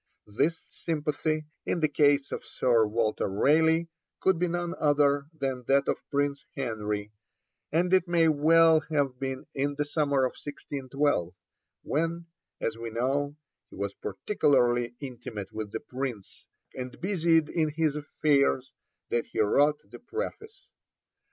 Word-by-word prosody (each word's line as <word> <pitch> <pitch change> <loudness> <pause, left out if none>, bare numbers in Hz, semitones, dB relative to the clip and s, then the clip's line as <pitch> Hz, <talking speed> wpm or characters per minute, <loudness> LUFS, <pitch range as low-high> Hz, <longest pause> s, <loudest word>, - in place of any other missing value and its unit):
This 150 +11 0 0.2
sympathy, 155 -1 -2 0.2
in - - -1
the 155 - +3
case 145 -1 +3
of - - -4
Sir 115 -4 +2
Walter 110 0 0
Raleigh, 160 +11 +3 0.3
could 190 -3 +2
be 180 - +2
none 175 0 -2
other 145 -1 +3
than 135 -5 -3
that 140 0 +3
of - - +1
Prince 140 -1 0
Henry; 105 -5 -3 0.6
and 175 +4 +2
it 185 -1 +4
may 170 -1 +4
well 160 +1 +5
have 140 -5 0
been 135 -1 -4
in 140 +1 -1
the 150 - -1
summer 145 -3 +1
of - - +1
1612, 140 - -2 0.5
when, 165 +3 -1 0.3
as 115 - -2
we 115 0 -4
know, 135 +5 -1 0.3
he - - -13
was 100 0 -3
particularly 120 - +1
intimate 120 -7 -7
with 110 -1 -5
the 110 - -3
Prince 125 -6 -6 0.3
and 130 -1 -7
busied 170 -4 +2
in 155 -2 0
his 155 -1 0
affairs, 140 -3 +1 0.4
that 120 - 0
he - - -5
wrote 145 +8 +4
the - - -12
Preface. 435 - -6
145 Hz, 140 wpm, -28 LUFS, 125-160 Hz, 0.6 s, well